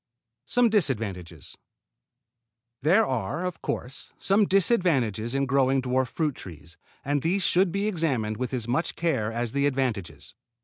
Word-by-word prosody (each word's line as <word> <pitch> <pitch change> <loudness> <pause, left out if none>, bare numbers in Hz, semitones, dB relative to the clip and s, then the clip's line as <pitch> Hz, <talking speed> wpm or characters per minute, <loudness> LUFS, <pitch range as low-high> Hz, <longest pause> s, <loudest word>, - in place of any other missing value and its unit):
SOME 245 -1 +3
DISADVANTAGES 105 - -2 1.2
There 180 +10 +4
are, 130 - -2
of 180 -2 -5
course, 130 +2 -5
some 200 +1 +3
disadvantages 145 - +2
in 140 0 +1
growing 135 0 +2
dwarf 130 0 0
fruit 155 0 -1
trees, 80 -6 -11 0.3
and 145 0 0
these 185 +5 0
should 180 0 +3
be 200 +3 -1
examined 135 - -1
with 125 +1 -3
as 120 -4 -2
much 130 +8 -1
care 130 -11 0
as 115 0 -3
the 140 +2 +1
advantages. 125 -9 -3
135 Hz, 140 wpm, -26 LUFS, 115-175 Hz, 1.2 s, There